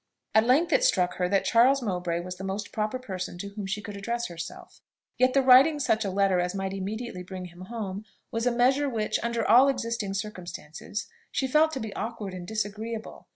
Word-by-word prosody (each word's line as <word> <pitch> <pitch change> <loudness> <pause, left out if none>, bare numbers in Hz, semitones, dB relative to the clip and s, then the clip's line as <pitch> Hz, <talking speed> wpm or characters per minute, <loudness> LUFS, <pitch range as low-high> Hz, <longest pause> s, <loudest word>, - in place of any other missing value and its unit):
At 220 +1 +4
length 295 +7 +4
it - - +4
struck 180 - +2
her 180 -1 0
that 195 0 +2
Charles 255 +3 +4
Mowbray 180 -4 -1
was 180 +1 -7
the 190 - -7
most 195 +2 -4
proper 215 +3 -1
person 185 -8 -5
to 200 +3 -6
whom 200 -1 -6
she 205 +2 -3
could 205 - -7
address 235 +3 -3
herself; 170 -1 -9 0.4
yet 255 +1 +4
the 275 - +5
writing 270 +4 +7
such 225 -5 +1
a 200 - -1
letter 195 -1 +2
as 180 +2 -1
might 195 0 -2
immediately 195 +1 -4
bring 185 0 -7
him 175 +1 -11
home, 210 -2 -5 0.3
was 230 +2 -1
a - - +4
measure 260 +4 +3
which, 220 -4 -1
under 235 -1 -1
all 250 +5 +7
existing 230 -6 -2
circumstances, 185 -2 -6 0.3
she 270 - 0
felt 305 +4 +4
to 265 - -3
be 220 -4 -5
awkward 215 -3 -5
and 180 -1 -7
disagreeable. 220 +2 -4
215 Hz, 205 wpm, -27 LUFS, 190-240 Hz, 0.4 s, writing